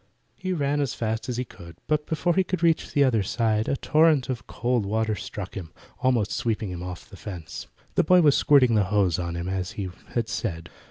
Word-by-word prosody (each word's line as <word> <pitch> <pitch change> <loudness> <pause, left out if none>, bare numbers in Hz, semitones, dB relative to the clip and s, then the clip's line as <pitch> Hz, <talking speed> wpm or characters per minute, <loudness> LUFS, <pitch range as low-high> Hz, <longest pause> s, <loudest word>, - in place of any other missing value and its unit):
He 185 - -4
ran 145 -4 0
as 140 -4 -1
fast 110 +2 -2
as 120 - -2
he 125 - -1
could, 85 -7 -13
but 150 0 0
before 165 +2 +1
he 190 - +3
could 185 -2 -3
reach 165 -1 +2
the 145 - +4
other 120 -6 +3
side 110 +2 0
a 135 - +1
torrent 155 -3 +3
of 125 -3 -4
cold 120 -1 0
water 110 +2 0
struck 105 -2 -6
him, 85 -6 -7 0.3
almost 125 -5 +1
sweeping 115 -4 -1
him 90 -1 -6
off 90 -1 -7
the 110 - -13
fence. 90 -7 -7 0.3
The - - +3
boy 180 +3 +6
was 145 -3 +5
squirting 135 -5 +5
the 105 -3 +3
hose 95 -3 +2
on 85 -1 -3
him 85 +1 -4
as 95 -1 -3
he 95 -3 -4 0.2
had 115 -2 +1
said. 80 -5 -4
115 Hz, 220 wpm, -25 LUFS, 95-140 Hz, 0.3 s, boy